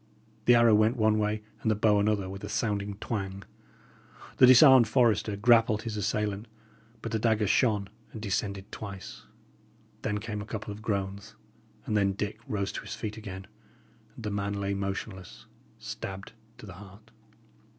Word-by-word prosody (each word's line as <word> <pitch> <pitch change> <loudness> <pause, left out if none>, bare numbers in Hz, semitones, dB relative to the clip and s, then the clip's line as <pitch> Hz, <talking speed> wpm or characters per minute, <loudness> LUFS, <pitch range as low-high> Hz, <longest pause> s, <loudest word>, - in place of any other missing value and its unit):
The 120 - +7
arrow 115 -1 +5
went 110 +4 +3
one 110 -1 +3
way 105 0 -1 0.2
and 110 - 0
the 110 - +3
bow 105 -1 +3
another 100 -2 +1
with 95 +1 -8
a - - -5
sounding 100 -2 -2
twang. 100 -2 -4 0.9
The 130 - +8
disarmed 130 -1 +8
forester 110 -3 +2
grappled 115 0 +4
his 110 -2 -4
assailant; 105 +1 -2 0.6
but 115 - -4
the 110 - 0
dagger 110 -1 +2
shone 105 -1 +2 0.2
and 110 - -8
descended 100 -1 -3
twice. 100 -3 -8 0.8
Then 105 - -1
came 105 0 -5
a - - -7
couple 110 -1 -5
of 105 - -11
groans, 100 -2 -3 0.5
and 105 - -1
then 100 -2 +2
Dick 105 +2 -4
rose 100 -2 -2
to - - -5
his 105 0 -7
feet 105 -2 -5
again, 95 -4 -8 0.7
and 120 - -10
the 105 - -3
man 100 0 -2
lay 100 0 -2
motionless, 100 -1 -5 0.3
stabbed 95 0 -7 0.3
to - - -11
the 95 - -9
heart. 100 +2 -15
105 Hz, 165 wpm, -28 LUFS, 100-110 Hz, 0.9 s, The